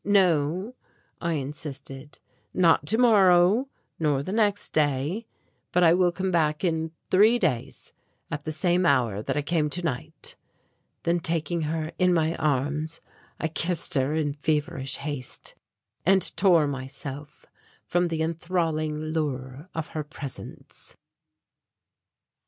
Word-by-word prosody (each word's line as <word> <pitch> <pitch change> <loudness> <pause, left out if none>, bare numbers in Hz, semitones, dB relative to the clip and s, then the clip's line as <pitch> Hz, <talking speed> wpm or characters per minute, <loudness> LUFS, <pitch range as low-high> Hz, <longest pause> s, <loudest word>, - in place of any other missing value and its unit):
"No," 185 - +2 0.5
I 170 -1 0
insisted, 140 -1 -6 0.4
"not 165 -5 +4
tomorrow, 210 - +5 0.3
nor 145 -4 +1
the 185 - -5
next 205 -1 +1
day, 150 - 0 0.4
but 180 - +3
I 165 -1 +7
will 180 0 +3
come 185 +2 -2
back 155 -2 +1
in 160 -2 0 0.2
three 215 +6 +6
days 150 - -2 0.4
at 145 0 -3
the 155 - -3
same 175 +3 +2
hour 120 -7 +2
that 110 - -2
I 150 - 0
came 150 0 +1
tonight." 160 -1 -4 0.7
Then 170 +1 +2
taking 165 0 -1
her 160 0 -2
in 180 -1 +4
my 160 0 +1
arms, 150 +3 0 0.4
I 160 - 0
kissed 165 +1 -2
her 135 +2 +2
in 150 -2 0
feverish 150 -1 -1
haste 140 -3 -5 0.5
and 190 0 +2
tore 170 -4 +5
myself 140 +1 -6 0.4
from 175 0 +1
the 160 -1 -1
enthralling 160 -2 -1
lure 150 -1 -3
of 160 -1 -3
her 155 - -3
presence. 145 -3 -9
160 Hz, 125 wpm, -26 LUFS, 145-175 Hz, 0.7 s, I